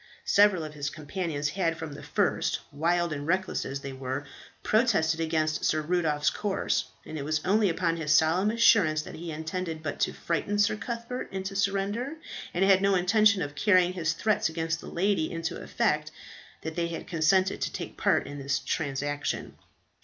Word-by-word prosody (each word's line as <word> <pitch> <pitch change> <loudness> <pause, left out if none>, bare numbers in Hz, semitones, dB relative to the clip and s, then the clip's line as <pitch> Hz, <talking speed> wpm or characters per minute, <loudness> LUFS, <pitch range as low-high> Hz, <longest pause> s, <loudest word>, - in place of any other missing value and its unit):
Several 200 -4 +4
of 155 -1 -7
his 145 -1 -3
companions 155 -1 -3
had 165 -1 -1
from 160 -3 -6
the 145 - -9
first, - - 0
wild 170 +3 +1
and 145 0 -5
reckless 185 +2 0
as 140 0 -5
they 135 -1 -6
were, 130 +2 -4 0.4
protested 200 -9 +2
against 160 -1 0
Sir 155 - +2
Rudolph's 155 -3 +1
course, 205 -2 -1 0.2
and 155 - -6
it - - -4
was 155 +2 0
only 205 +1 +3
upon 165 -1 0
his 155 -2 -2
solemn 160 +7 +4
assurance 205 -9 +4
that - - -9
he 165 0 -6
intended 160 +1 -4
but 145 - -4
to - - +1
frighten 170 +5 -2
Sir 205 +1 +3
Cuthbert 235 +2 -5
into 190 0 -4
surrender, 200 +7 0 0.4
and 185 +2 +2
had 195 -1 +5
no 200 0 +3
intention 200 +2 +4
of 145 0 -5
carrying 185 +2 +3
his 165 -3 0
threats 210 0 +1
against 160 0 -2
the - - -10
lady 190 -2 0
into 165 -1 -4
effect, - - 0 0.5
that 160 0 -5
they 170 -1 0
had 170 -1 -6
consented 185 +3 +2
to - - -1
take - - -6
part - - +2
in 145 0 -7
the 140 0 0
transaction. 145 0 -2
165 Hz, 180 wpm, -28 LUFS, 155-195 Hz, 0.5 s, had